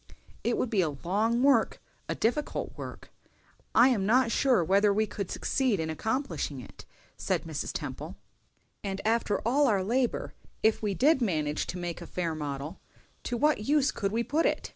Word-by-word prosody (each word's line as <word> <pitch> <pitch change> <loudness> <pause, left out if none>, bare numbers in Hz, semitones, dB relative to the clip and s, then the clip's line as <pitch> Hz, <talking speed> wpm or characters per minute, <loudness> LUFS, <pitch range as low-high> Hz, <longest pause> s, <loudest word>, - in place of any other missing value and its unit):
"It 235 - +1
would 250 - -1
be 205 -4 +3
a 165 - +1
long 225 +7 +1
work—a 280 0 +1
difficult 245 +7 -1
work; - - -9 0.6
I 250 - +7
am 225 -7 +1
not 245 +1 +4
sure 255 -9 +3
whether 200 +4 +4
we 215 +2 +2
could 200 -2 -5
succeed 255 - 0
in 160 0 -2
accomplishing 255 - -2
it," - - -12 0.3
said - - -1
Mrs. - - -4
Temple. - - -6 0.7
"And 195 -1 -3
after 220 -3 +1
all 280 +4 +4
our 200 -5 +2
labor, 240 +4 0 0.3
if 220 0 +3
we 205 -3 -1
did 280 - +4
manage 155 -8 0
to 180 - -4
make 175 -1 -4
a - - -8
fair 170 -3 -2
model, 145 +2 -5 0.5
to 240 - -2
what 295 -6 +2
use 285 0 +3
could 195 -1 -2
we 230 +2 0
put 310 +6 +1
it? - - -2
220 Hz, 175 wpm, -29 LUFS, 185-255 Hz, 0.7 s, I